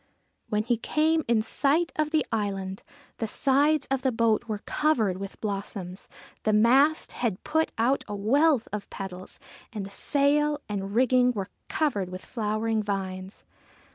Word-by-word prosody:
When 210 -1 +1
he 240 +1 +1
came 315 +6 +1
in 230 -2 +3
sight 295 +8 +1
of 305 -1 0
the 310 -3 +1
island, 195 -3 -2 0.4
the 225 - -2
sides 285 +5 +2
of 270 -1 +1
the 260 - +1
boat 230 -1 +2
were 215 -3 -4
covered 225 -12 +1
with 195 +1 -7
blossoms, 195 -3 -5 0.3
the 215 - +1
mast 265 +8 +4
had 225 -7 -2
put 315 +1 0
out 245 +5 +2
a 205 - -4
wealth 265 +5 +3
of 210 -1 -4
petals, 185 -2 -8 0.3
and 210 -3 -5
the 200 - -10
sail 295 +4 +2
and 200 -1 -4
rigging 250 0 +4
were 200 -3 -4 0.2
covered 210 - 0
with 185 0 -8
flowering 220 0 -1
vines. 190 -2 -4
225 Hz, 155 wpm, -27 LUFS, 200-280 Hz, 0.4 s, mast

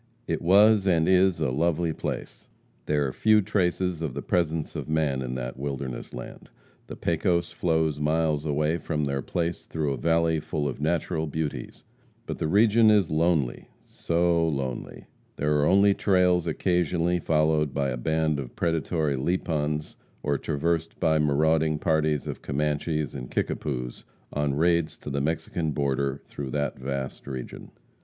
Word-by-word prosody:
It - - -2
was 100 +3 +5
and 80 -3 +3
is 95 -1 +4
a 65 - 0
lovely 85 +3 +1
place. - - -5 0.4
There 75 -1 +1
are 65 - -3
few 110 0 +4
traces 90 -4 0
of 75 -6 -3
the - - -4
presence 80 -3 -1
of - - -5
man 75 -4 +1
in 65 -1 -4
that 60 0 -5
wilderness 70 -3 -4
land. - - -9 0.4
The - - -7
Pecos 85 +1 0
flows 80 -3 0
miles 75 0 +1
away 75 +2 0
from 75 -2 -2
their 70 -1 -1
place 85 +5 -3
through 75 -3 -1
a - - -4
valley 80 +3 +2
full 75 -1 -2
of 70 +1 -5
natural 80 0 0
beauties. 75 0 -4 0.4
But - - -5
the - - 0
region 110 +5 +5
is 105 -5 +3
lonely 80 -5 +1 0.2
so 85 0 +1
lonely! 65 -4 -4 0.3
There 75 0 +1
are 75 - +3
only 100 +1 +5
trails 90 -3 +2
occasionally 90 +1 +1
followed 75 -2 +2
by 70 0 -1
a 65 - -2
band 80 +3 0
of 65 -3 -7
predatory 80 -2 0
Lipans, 75 0 -1 0.3
or 70 -1 0
traversed 80 +2 -1
by 80 -1 +3
marauding 75 +1 +2
parties 75 -3 +1
of - - -6
Comanches 75 0 -1
and 65 -2 -7
Kickapoos, 60 -4 -3 0.3
on 75 -1 0
raids 85 +1 +1
to 75 - -7
the 70 0 -1
Mexican 80 +1 -2
border 70 -1 -1
through 70 -2 -6
that 70 0 -2
vast 65 0 -5
region. 65 -3 -7
80 Hz, 155 wpm, -26 LUFS, 70-85 Hz, 0.4 s, was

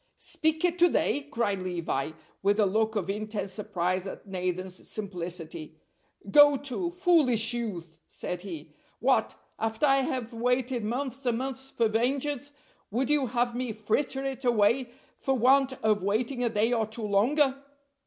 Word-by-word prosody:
"Speak 315 +1 0
it 355 0 0
to 350 +1 +6
day!" 305 -3 +1
cried 210 -7 -1
Levi, 170 -5 -2 0.3
with 205 +2 +2
a 210 - +5
look 220 +3 +1
of 195 -4 -1
intense 205 -1 -3
surprise 185 -2 -1
at - - -8
Nathan's 185 0 -4
simplicity. 170 -5 -5 0.5
"Go 290 +1 +7
to, 285 +6 -3
foolish 300 - +3
youth!" 175 -9 -5
said 180 -1 -4
he; 160 -5 -8 0.2
"what, 255 -3 +2 0.2
after 225 +5 0
I 275 -1 +5
have 255 -3 -2
waited 250 +1 0
months 260 +4 -3
and 235 -2 +2
months 265 +1 -4
for 230 -4 +1
vengeance, 270 +5 0 0.4
would 250 +6 0
you 290 -3 +3
have 240 0 0
me 245 -2 -2
fritter 265 +6 -1
it 270 -1 -4
away 235 +1 +3 0.3
for 270 - 0
want 265 +2 +4
of 215 -2 +3
waiting 235 +6 0
a 240 - +2
day 225 +2 +1
or 225 -2 +1
two 220 0 -5
longer? 265 +7 +2
230 Hz, 155 wpm, -28 LUFS, 200-270 Hz, 0.5 s, Go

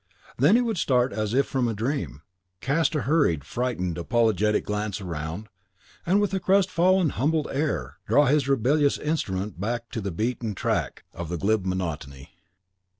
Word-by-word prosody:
Then - - +4
he 245 - +4
would 225 -6 -1
start 125 -4 +2
as 105 0 -2
if 140 +1 +3
from 130 -3 0
a 115 - -2
dream, 100 - -3 0.4
cast 155 - +1
a 145 - 0
hurried, 135 - +2
frightened, 90 -7 -2
apologetic 110 +1 +1
glance 105 -1 -2
around, 85 +2 -5 0.6
and, 190 +4 +4
with 205 -2 0
a 190 - +1
crestfallen, 185 -2 +3
humbled 150 +4 0
air, 145 +2 -2
draw 145 - +5
his 140 0 +2
rebellious 140 +3 +2
instrument 100 - -3
back 115 +3 -3
to 115 - -3
the 100 - -3
beaten 110 +3 -2
track - - -2
of 85 -2 -6
the 90 - -2
glib 100 +2 0
monotony. 75 -7 -4
120 Hz, 160 wpm, -25 LUFS, 95-150 Hz, 0.6 s, draw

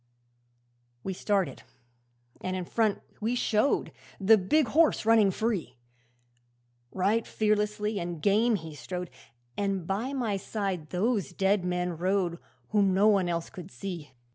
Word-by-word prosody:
'We 190 - -3
started, 190 -6 -1 0.8
and 185 0 -2
in 185 -1 -3
front 215 +1 0 0.2
we 225 +3 0
showed, 235 +2 +1 0.3
The 205 +3 +6
big 235 +7 +2
horse 315 -3 +3
running 220 -3 +5
free: 190 - -2 1.1
Right 200 +5 +1
fearlessly 210 0 0
and 170 -1 -4
game 215 +6 +3
he 160 -5 -6
strode, 180 +6 -6 0.5
And 195 -3 -1
by 215 +9 -2
my 230 -7 -1
side 190 -6 -3
those 200 0 0
dead 195 +1 +2
men 180 -1 -1
rode 180 -1 0 0.3
Whom 200 -3 +3
no 205 +3 +5
one 195 -4 +3
else 170 -1 -2
could 180 0 -9
see. 175 -9 -7
195 Hz, 135 wpm, -28 LUFS, 180-215 Hz, 1.1 s, The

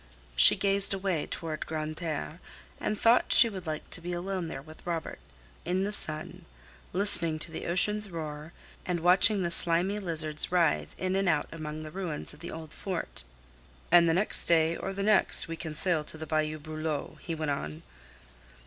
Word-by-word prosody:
She 60 - +6
gazed 200 0 +1
away 190 -5 -3
toward 160 -2 -5
Grande 155 0 -5
Terre 160 -1 -5 0.4
and 215 - -3
thought 230 +2 +3
she 235 - +11
would 190 -5 -9
like 155 -1 -5
to 170 - -2
be 175 +1 -6
alone 180 0 -4
there 145 - -7
with 155 +1 -15
Robert, 170 -2 -5 0.4
in 185 +2 -1
the 205 - -3
sun, 165 -1 -4 0.5
listening 175 -4 +3
to 165 +1 -1
the - - -7
ocean's 210 +4 +3
roar 155 -2 -7 0.3
and 175 -2 -3
watching 185 +3 +5
the 170 - -2
slimy 175 +5 +2
lizards 155 -5 -2
writhe 170 -3 0
in 185 0 -2
and 195 -1 0
out 155 -3 -1
among 155 -1 -7
the 155 - -9
ruins 180 -5 -4
of - - -16
the 170 - -8
old 160 -1 -9
fort. 185 -4 -5 0.7
"And 170 -1 +5
the 165 - +1
next 195 +4 +2
day 165 0 +2
or 195 - -5
the 195 0 -4
next 210 -1 +3
we 165 - -6
can 160 -1 -7
sail 165 -1 +5
to 160 - -6
the 160 - -7
Bayou 155 0 -2
Brulow," 155 -1 -6
he 165 - -5
went 155 -2 -3
on. 75 - -6
170 Hz, 185 wpm, -28 LUFS, 155-185 Hz, 0.7 s, she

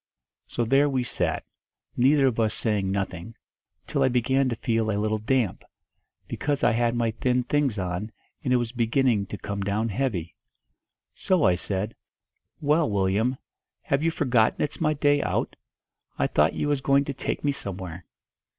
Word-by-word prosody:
"So 120 - -2
there 135 +5 +4
we 130 -2 0
sat, 120 - -2 0.5
neither 135 +3 +4
of 125 -3 +1
us 110 -1 +1
saying 105 -4 0
nothing, 95 +1 -3 0.5
till - - -1
I - - +5
began 130 +2 +2
to 120 - -2
feel 115 -2 0
a 100 - 0
little 110 +1 0
damp, 115 -3 0 0.6
because 145 -1 -2
I - - +5
had 120 +1 +1
my 115 -1 +1
thin 125 +2 0
things 140 -5 0
on, 90 +3 -3 0.3
and 130 - -1
it - - +5
was 120 -2 0
beginning 115 -3 +1
to 105 - -6
come 100 -1 -4
down 105 +3 0
heavy. 100 -7 -2 0.8
So 185 -4 +1
I 90 - +5
said, 95 +4 -3 0.7
'Well, 150 0 +2
Willyum, 100 +6 +1 0.5
have 135 +1 0
you 165 - +2
forgotten 125 -8 +2
it's 150 +3 -4
my 155 -1 +2
day 145 0 +3
out? - - -1 0.6
I - - +2
thought 75 +1 +2
you 150 - -1
was 145 -2 +1
going 140 +1 +3
to 140 - -3
take 130 - -4
me 145 - +2
somewhere.' 95 -8 -6
120 Hz, 170 wpm, -26 LUFS, 100-135 Hz, 0.8 s, I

